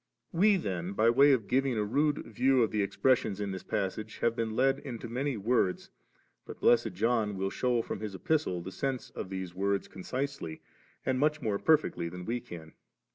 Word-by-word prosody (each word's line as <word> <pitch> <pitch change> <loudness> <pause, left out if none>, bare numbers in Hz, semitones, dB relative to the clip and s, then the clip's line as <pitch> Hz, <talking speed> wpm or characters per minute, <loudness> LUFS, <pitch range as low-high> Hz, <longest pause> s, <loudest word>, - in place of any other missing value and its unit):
We 200 +4 +4
then, 95 - -3
by 110 +3 +4
way 140 +4 +6
of 125 -6 +2
giving 130 -2 +1
a 105 - +1
rude 145 +7 +1
view 125 +3 +3
of 110 - 0
the 105 - +1
expressions 105 +1 +1
in 100 -1 -2
this 95 -1 -5
passage, 105 +3 -3
have 115 0 +1
been 110 -1 -2
led 135 +2 +3
into 120 -4 -7
many 130 +2 -2
words, 105 -3 0 0.5
but - - -10
blessed - - +3
John 110 0 +1
will 95 +1 -1
shew 125 -2 +1
from - - -5
his 105 -3 -5
Epistle 145 - 0
the 95 - -6
sense 135 +3 -3
of - - -6
the 95 -1 -4
words, 100 +1 0
concisely 130 - -4 0.5
and 130 -1 +1
much 150 +1 +2
more 105 -7 -1
perfectly 150 - +2
than 90 +1 -8
we 120 +2 -1
can. 80 -7 -10
115 Hz, 190 wpm, -30 LUFS, 95-135 Hz, 0.5 s, way